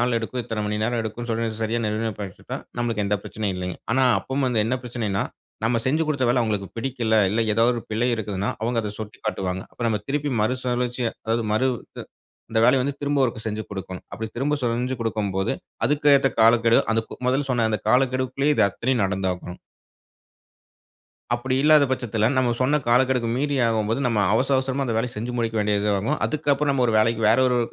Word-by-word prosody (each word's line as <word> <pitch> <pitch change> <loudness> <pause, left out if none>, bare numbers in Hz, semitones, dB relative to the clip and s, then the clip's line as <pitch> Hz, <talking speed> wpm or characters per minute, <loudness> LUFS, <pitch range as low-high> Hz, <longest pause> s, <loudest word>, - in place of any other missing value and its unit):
நாள் 120 -1 +2
எடுக்கும், 120 +2 -4
இத்தன 110 -2 -3
மணி 105 0 -1
நேரம் 120 +1 0
எடுக்கும்னு 115 +2 -5
சொல்லி, 115 0 0
சரியா 115 +2 0
நிர்ணயம் 110 0 -2
பண்ணிட்டா 95 -3 -6 0.2
நம்மளுக்கு 115 -3 0
எந்த 105 - +1
பிரச்சனையும் 105 -3 -3
இல்லீங்க. 90 -1 -4 0.2
ஆனா, 130 +2 +4
அப்பவும் 135 0 -2
வந்து, 115 -4 +2
என்ன 120 +4 0
பிரச்சனைனா, 115 -5 -2 0.4
நம்ப 115 +1 +2
செஞ்சு 155 +5 +2
குடுத்த 140 -4 0
வேல 125 +1 +3
அவங்களுக்கு 105 -4 -2
பிடிக்கல. 115 -2 0
இல்ல, 110 +3 +1
ஏதாவது 115 +3 +3
ஒரு 115 - -4
பிழை 115 +3 +1
இருக்குதுனா, 100 -3 -2
அவங்க 120 +1 0
அத 105 -1 -4
சுட்டிக் 110 0 -9
காட்டுவாங்க. 95 -3 -2
அப்ப - - -21
நம்ப 105 -2 0
திருப்பி 145 +1 -1
மறுசுழற்சியா 125 +1 -1
அதாவது 115 +1 0
மறு 130 +5 +2 0.3
து - - -5 0.5
இந்த 110 0 +2
வேலையை 130 +2 +5
வந்து 140 +2 -2
திரும்ப 145 0 0
ஒருக்க 115 -3 -2
செஞ்சி 110 0 -2
கொடுக்கணும். 95 -2 -7
அப்படி 110 +2 -4
திரும்ப 140 +4 +1
செஞ்சி 125 +2 0
குடுக்கும்போது, 105 -3 -1 0.3
அதுக்கு 150 +2 +2
ஏத்த 135 - +2
காலக்கெடு, 115 +1 +5
அதுக்கு 110 0 -3
முதல்ல 135 +2 0
சொன்ன 120 -3 +2
அந்த 110 - 0
காலக்கெடுக்குள்ளயே 130 +3 +2
இது - - +4
அத்தனையும் 120 +3 -1
நடந்தாகனும். 95 -2 -3 1.8
அப்படி 130 +2 -2
இல்லாத 150 -1 +6
பட்சத்துல, 115 -4 0
நம்ப 130 -2 +2
சொன்ன 145 +4 +3
காலக்கெடுக்கு 125 0 +3
மீறி 145 +1 0
ஆகும்போது, 110 +2 0
நம்ப 115 -4 +1
அவசர 135 +4 +2
அவசரமா 130 +1 -1
அந்த 115 - -1
வேலைய 120 +2 -1
செஞ்சி 115 +3 -3
முடிக்க 115 -1 -1
வேண்டியது 105 0 +1
ஆகும். 135 +10 -1
அதுக்கு 155 -1 -1
அப்புறம் 145 +1 +1
நம்ப 130 -2 +2
1 115 - 0
வேலைக்கு 115 +1 +2
வேறு 115 +4 +4
1 125 -1 +2
115 Hz, 190 wpm, -23 LUFS, 110-130 Hz, 1.8 s, இல்லாத